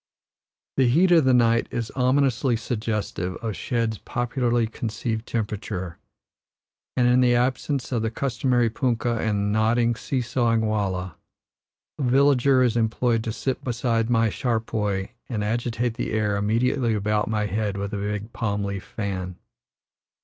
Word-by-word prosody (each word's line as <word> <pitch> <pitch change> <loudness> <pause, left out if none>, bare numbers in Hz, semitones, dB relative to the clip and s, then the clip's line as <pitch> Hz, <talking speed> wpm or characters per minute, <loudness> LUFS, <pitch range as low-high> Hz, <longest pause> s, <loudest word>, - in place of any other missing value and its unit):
The 130 -2 +4
heat 170 +9 +4
of 165 -5 +6
the 130 - +4
night 115 -1 +3
is 115 -2 -3
ominously 130 -1 +2
suggestive 105 -5 -3
of 110 -3 -4
shed's 115 +3 -1
popularly 120 -1 0
conceived 110 0 -4
temperature, 105 -5 -4 1.0
and, 125 -1 +4
in 125 +1 +4
the 120 -1 +4
absence 130 +2 0
of 120 -3 0
the 110 - 0
customary 120 -1 0
punkah 120 -2 0
and 105 -2 0
nodding, 115 +2 +2
see 130 +3 -2
sawing 120 -1 +1
wallah, 95 -5 -2 0.8
a - - -2
villager 135 0 +4
is 120 -2 +2
employed 115 0 +1
to 115 - -1
sit 125 +4 -3
beside 115 -2 0
my 115 -1 +3
charpoy 110 -5 -1 0.2
and 110 -4 -2
agitate 120 +2 -1
the 120 -2 -4
air 105 -2 +1
immediately 115 +3 +1
about 105 +1 0
my 105 -1 0
head 105 0 -2
with 100 +1 -4
a - - -1
big 105 +2 -4
palm 105 -3 -1
leaf 100 -1 -4
fan. 95 -4 -4
115 Hz, 145 wpm, -24 LUFS, 105-125 Hz, 1.0 s, of